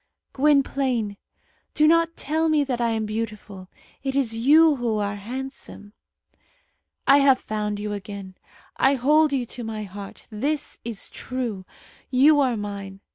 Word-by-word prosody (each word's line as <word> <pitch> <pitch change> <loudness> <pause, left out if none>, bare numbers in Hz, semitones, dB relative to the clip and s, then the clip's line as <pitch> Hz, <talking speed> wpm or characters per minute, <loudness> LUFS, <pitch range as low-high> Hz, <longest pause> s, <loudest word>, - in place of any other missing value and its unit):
"Gwynplaine, 270 -6 +1 0.6
do 305 - +5
not 330 +1 +3
tell 320 +2 0
me 305 -2 +3
that 250 -3 -2
I 235 - +2
am 220 -1 -1
beautiful. 210 -3 -5 0.3
It 270 0 -3
is 250 -5 +1
you 295 +6 +5
who 235 -3 -1
are 205 -1 -2
handsome." 240 -2 -7 1.1
"I 275 +1 +6
have 275 -2 +5
found 210 -1 -3
you 210 0 -3
again. 200 -1 -7 0.4
I 270 +1 +4
hold 300 +4 +3
you 265 -3 0
to 240 +1 -8
my 220 -1 -4
heart. 200 0 -10
This 280 +7 -2
is 230 -4 -5
true. 235 -7 -5 0.4
You 285 +4 +5
are 255 -4 +2
mine. 200 -2 -6
240 Hz, 145 wpm, -24 LUFS, 210-280 Hz, 1.1 s, I